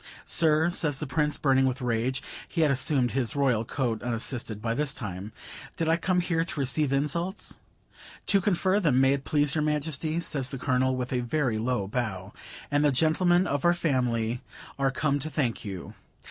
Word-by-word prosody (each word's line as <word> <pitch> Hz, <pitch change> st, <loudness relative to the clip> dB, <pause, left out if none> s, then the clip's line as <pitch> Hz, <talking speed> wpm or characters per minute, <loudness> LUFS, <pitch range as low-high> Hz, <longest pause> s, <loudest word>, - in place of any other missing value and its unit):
"Sir," 160 Hz, 0 st, +3 dB
says 150 Hz, -6 st, 0 dB
the -, -, -2 dB
Prince, 150 Hz, +2 st, 0 dB
burning 135 Hz, -2 st, +3 dB
with 130 Hz, +1 st, -2 dB
rage 125 Hz, +1 st, -1 dB, 0.2 s
(he 165 Hz, -, -2 dB
had 150 Hz, -3 st, +4 dB
assumed 130 Hz, -1 st, +2 dB
his 130 Hz, -1 st, -1 dB
Royal 130 Hz, -6 st, +2 dB
coat 115 Hz, -2 st, -2 dB
unassisted 115 Hz, -1 st, -2 dB
by 115 Hz, +1 st, -1 dB
this 145 Hz, +2 st, -1 dB
time), 95 Hz, +2 st, -6 dB, 0.5 s
"did 165 Hz, -, -1 dB
I 165 Hz, -, +4 dB
come 180 Hz, +1 st, +1 dB
here 165 Hz, -2 st, 0 dB
to 165 Hz, -, -6 dB
receive 135 Hz, +2 st, +1 dB
insults?" 170 Hz, +8 st, -2 dB, 0.7 s
"To 200 Hz, -, +3 dB
confer 190 Hz, +1 st, +2 dB
them, 150 Hz, -10 st, +3 dB
may 135 Hz, +1 st, +4 dB
it 140 Hz, -1 st, -3 dB
please 145 Hz, -2 st, +2 dB
your 155 Hz, -, +1 dB
Majesty," 155 Hz, +1 st, -1 dB
says 140 Hz, -6 st, -1 dB
the 135 Hz, -, -5 dB
Colonel, 130 Hz, 0 st, +1 dB
with 125 Hz, 0 st, -3 dB
a 125 Hz, -, +1 dB
very 120 Hz, -2 st, 0 dB
low 120 Hz, -3 st, -1 dB
bow, 100 Hz, -4 st, -3 dB, 0.4 s
"and 145 Hz, 0 st, +2 dB
the 145 Hz, -, +4 dB
gentlemen 175 Hz, +6 st, +3 dB
of 145 Hz, -5 st, -1 dB
our 175 Hz, 0 st, +4 dB
family 125 Hz, -7 st, 0 dB, 0.4 s
are 135 Hz, 0 st, +3 dB
come 140 Hz, +1 st, 0 dB
to 150 Hz, +3 st, -4 dB
thank 130 Hz, -7 st, -1 dB
you." 95 Hz, -4 st, -7 dB
140 Hz, 190 wpm, -27 LUFS, 125-155 Hz, 0.7 s, had